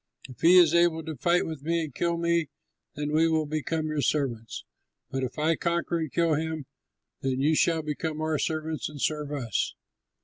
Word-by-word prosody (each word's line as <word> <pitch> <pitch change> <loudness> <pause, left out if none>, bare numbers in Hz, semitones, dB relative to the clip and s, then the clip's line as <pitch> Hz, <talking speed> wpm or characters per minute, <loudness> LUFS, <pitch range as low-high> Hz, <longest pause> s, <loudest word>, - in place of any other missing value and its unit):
If 130 - -13
he 175 +3 +7
is 170 -3 +7
able 170 -1 +3
to 160 -1 -5
fight 170 +7 +2
with 160 -4 -6
me 165 +2 0
and 150 -4 -7
kill 170 +3 0
me, 170 -2 +1 0.5
then 150 0 -3
we 160 +2 +4
will 160 -1 +1
become 155 +1 -2
your 155 -1 -1
servants; 120 -7 -1 0.5
but 135 - -2
if 125 +4 -4
I 155 +2 +2
conquer 170 +1 -1
and 160 -4 -3
kill 170 -2 +2
him, 160 -1 -2 0.6
then 130 -1 -1
you 150 +4 +3
shall 160 0 +2
become 155 +1 -3
our 155 -1 0
servants 155 -1 -2
and 150 -1 -10
serve 150 0 -1
us." 125 -7 -2
155 Hz, 195 wpm, -27 LUFS, 145-165 Hz, 0.6 s, he